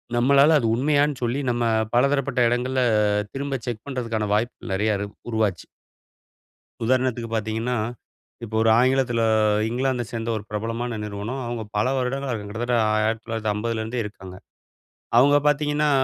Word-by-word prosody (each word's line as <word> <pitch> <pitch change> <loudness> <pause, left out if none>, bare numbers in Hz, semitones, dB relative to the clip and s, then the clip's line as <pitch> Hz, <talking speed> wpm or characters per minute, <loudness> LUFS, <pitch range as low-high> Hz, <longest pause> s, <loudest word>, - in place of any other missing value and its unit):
நம்மளால 140 +5 +5
அது 115 - 0
உண்மையானு 145 +2 +2
சொல்லி, 120 +4 0
நம்ம 120 0 0 0.3
பலதரப்பட்ட 140 0 +2
இடங்கள்ல 125 +2 0 0.5
திரும்ப 135 -1 -3
செக் 115 0 -4
பண்றதுக்கான 115 -5 -2
வாய்ப்புகள் 110 -1 -2
நெறைய 105 +1 +1
இரு 100 - -3 0.2
உருவாச்சு. 105 -6 0 1.2
உதாரணத்துக்கு 125 -1 0
பாத்தீங்கன்னா, 110 +3 -1 0.7
இப்போ 110 -1 -5
ஒரு 115 - +4
ஆங்கிலத்தில 130 -2 +2 0.5
இங்கிலாந்த 125 0 0
சேந்த 115 0 -3
ஒரு 105 - -7
பிரபலமான 115 +2 -3
நிறுவனம். 105 +6 -5
அவுங்க 120 -2 -4
பல 105 - +2
வருடங்களா 130 +1 -2
இருக்காங் 105 -3 -4
கிட்டத்தட்ட 120 +2 -1
ஆ - - +1 0.2
1950 115 0 -2
லேருந்தே 110 +2 -3
இருக்காங்க. 95 -3 -9 0.8
அவங்க 145 +3 +6
பாத்தீங்கன்னா 150 0 +2
120 Hz, 130 wpm, -23 LUFS, 110-130 Hz, 1.2 s, அவங்க